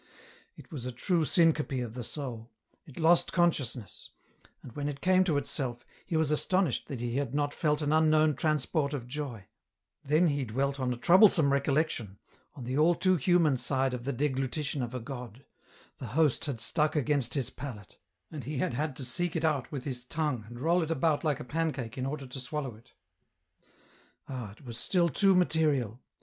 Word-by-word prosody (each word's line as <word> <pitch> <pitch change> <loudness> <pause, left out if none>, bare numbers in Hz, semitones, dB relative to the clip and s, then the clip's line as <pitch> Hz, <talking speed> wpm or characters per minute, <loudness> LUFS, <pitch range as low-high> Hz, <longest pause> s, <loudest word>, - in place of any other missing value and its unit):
It - - -15
was 130 -6 -5
a - - -3
true 160 - 0
syncope 155 -5 +2
of 115 -2 -7
the 125 0 -5
soul; 120 -4 -6 0.4
it 145 - -14
lost 170 +1 +4
consciousness; 140 - -1 0.5
and 125 - -10
when 145 +4 -3
it 140 -1 -6
came 185 +3 +4
to 160 -6 +1
itself, 125 -4 -3 0.2
he 170 - 0
was 160 -2 +1
astonished 175 -1 +1
that 130 -4 -5
he 120 +1 -2
had 140 -2 -2
not 145 0 0
felt 150 -1 0
an 145 +1 +1
unknown 155 -1 +4
transport 150 -1 0
of 120 -4 -6
joy; 125 -7 -5 0.6
then 155 +5 +3
he 145 -1 -1
dwelt 135 +4 -1
on 130 -1 0
a 125 - -3
troublesome 170 - +5
recollection, 140 -7 0 0.4
on 130 - -8
the 130 +4 -1
all 170 +3 +5
too 185 +2 +3
human 165 -2 +3
side 130 +1 0
of 125 -1 -4
the 140 - 0
deglutition 140 +1 -1
of 120 0 -4
a - - -2
God; 125 0 -8 0.5
the 125 - -6
Host 155 -5 +3
had 140 -6 -4
stuck 150 +6 0
against 140 -3 +1
his 135 -4 -1
palate, 120 -8 -9 0.3
and 150 -4 -6
he 150 +1 -4
had 130 - 0
had 145 +2 -2
to 130 - -5
seek 175 +6 -2
it 155 -5 0
with 135 -4 -4
his 125 -3 -5
tongue 135 -4 -2
and 120 +1 -10
roll 170 +4 +3
it 160 - -2
about 160 -1 +1
like 150 -4 0
a - - -5
pancake 140 -5 -2
in 130 -1 -2
order 140 0 -4
to 130 +1 -8
swallow 135 0 -4
it. 115 +4 -19 1.3
Ah! 125 -6 -6
it 120 - -18
was 115 -2 -6
still 175 +2 +2
too 195 +6 +4
material 150 - +1
140 Hz, 190 wpm, -30 LUFS, 125-155 Hz, 1.3 s, troublesome